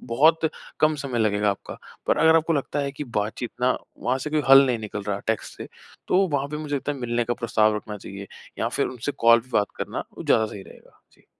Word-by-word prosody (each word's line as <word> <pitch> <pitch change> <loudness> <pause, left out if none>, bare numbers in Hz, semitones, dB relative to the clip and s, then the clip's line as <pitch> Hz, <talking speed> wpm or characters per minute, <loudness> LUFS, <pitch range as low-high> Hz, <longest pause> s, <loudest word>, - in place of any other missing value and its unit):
बहुत 155 +7 +3 0.3
कम 155 0 +4
समय 140 -4 -3
लगेगा 105 -2 +2
आपका। 100 - -6 0.3
पर - - +3
अगर 160 0 +6
आपको 165 +1 +2
लगता 145 -1 -1
है 140 -1 -2
कि 145 +2 -6
बातचीत 115 0 -3
ना 125 +1 +2 0.2
वहाँ 130 +1 0
से 150 +3 -5
कोई 155 0 +1
हल 135 0 +9
नहीं 125 -3 0
निकल 105 -1 -5
रहा 100 0 -2
है 100 - -9
टेक्स्ट 110 -1 -2
से, - - -7 0.4
तो 180 - +4
वहाँ 140 -2 -1
पे 150 - -4
मुझे 150 -1 -4
लगता 140 +1 -2
है 140 - -8
मिलने 120 -1 -1
का 120 +1 -1
प्रस्ताव 110 -2 +2
रखना 105 0 -6
चाहिए 100 0 -9 0.3
या - - 0
फिर - - 0
उनसे 130 +3 -4
कॉल 115 0 +6
पे 125 - -20
बात 105 -2 +3
करना, - - -4
वो - - -6
ज़्यादा 110 -1 +3
सही 100 -2 -8
रहेगा। - - -18
जी। - - -27
120 Hz, 240 wpm, -24 LUFS, 110-145 Hz, 0.4 s, हल